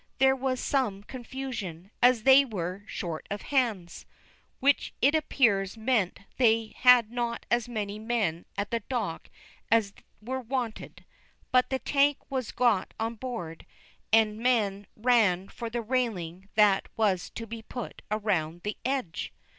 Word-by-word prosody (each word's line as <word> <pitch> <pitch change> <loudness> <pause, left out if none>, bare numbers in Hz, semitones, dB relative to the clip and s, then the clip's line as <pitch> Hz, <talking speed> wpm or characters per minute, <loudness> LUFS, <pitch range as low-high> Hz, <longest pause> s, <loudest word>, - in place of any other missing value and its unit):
There 265 0 +5
was 260 -1 -1
some 220 -8 0
confusion, 225 -8 -6
as 245 -2 +5
they 270 +2 +8
were 190 -6 -4
"short 165 -4 -5
of 205 0 -4
hands," 225 -11 -1 0.5
which 280 +1 +2
it 280 +4 +4
appears 225 -10 +2
meant 220 -6 0 0.2
they 225 -3 +3
had 245 -3 +6
not 240 -1 -3
as 240 0 +1
many 210 -3 -4
men 215 -7 -1
at 200 0 -2
the 230 - +1
dock 215 -7 -4 0.4
as 215 -3 +3 0.3
were 260 +4 -4
wanted. 245 -2 -4 0.5
But 255 0 +4
the 265 - 0
tank 280 +1 +2
was 260 -4 -2
got 235 -6 +1
on 225 +1 -1
board, 220 -9 -6 0.5
and 220 -1 +4
men 210 -5 +1
ran 215 -6 +2
for 235 -1 -6
the 235 0 -3
railing 200 -7 -2
that 205 -2 +4
was 200 -5 +1
to 230 - -5
be 230 0 -7
put 240 0 -7
around 175 -6 -1
the 210 - -3
edge. 260 -10 -2
225 Hz, 145 wpm, -28 LUFS, 200-250 Hz, 0.5 s, they